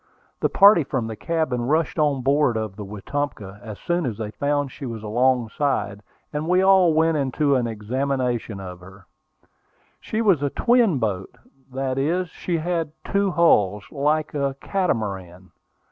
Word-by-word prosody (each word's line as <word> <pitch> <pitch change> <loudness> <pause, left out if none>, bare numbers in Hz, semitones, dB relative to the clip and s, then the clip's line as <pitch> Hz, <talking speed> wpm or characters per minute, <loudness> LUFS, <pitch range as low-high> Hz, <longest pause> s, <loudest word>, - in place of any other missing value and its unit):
The - - +1
party 200 -4 +6
from 130 -4 -2
the 110 0 -5
cabin 155 -2 -1
rushed 155 +3 0
on 145 -4 +1
board 140 -3 +2
of 110 -3 -4
the 105 - -7
Wetumpka 105 0 -5
as 110 -4 -8
soon 175 -3 -1
as 110 -4 -4
they 110 -2 -5
found 145 +3 -1
she 135 - -7
was 115 -2 -6
alongside, 120 -2 0 0.3
and 150 +2 -3
we 180 +2 +3
all 190 -3 +5
went 160 0 +3
into 140 +1 +1
an 125 -2 +1
examination 120 0 -2
of 90 -2 -8
her. 95 +1 -15 0.9
She 215 - -4
was 190 -9 +3
a 145 - 0
"twin 235 - +3
boat:" 105 -1 -3 0.3
that 135 0 -2
is, 175 +5 0
she 170 +1 -3
had 165 -2 -2
two 200 0 0
hulls, 105 - +3
like 150 +2 0
a 140 -2 -1
"catamaran." 95 - -3
135 Hz, 160 wpm, -23 LUFS, 110-160 Hz, 0.9 s, party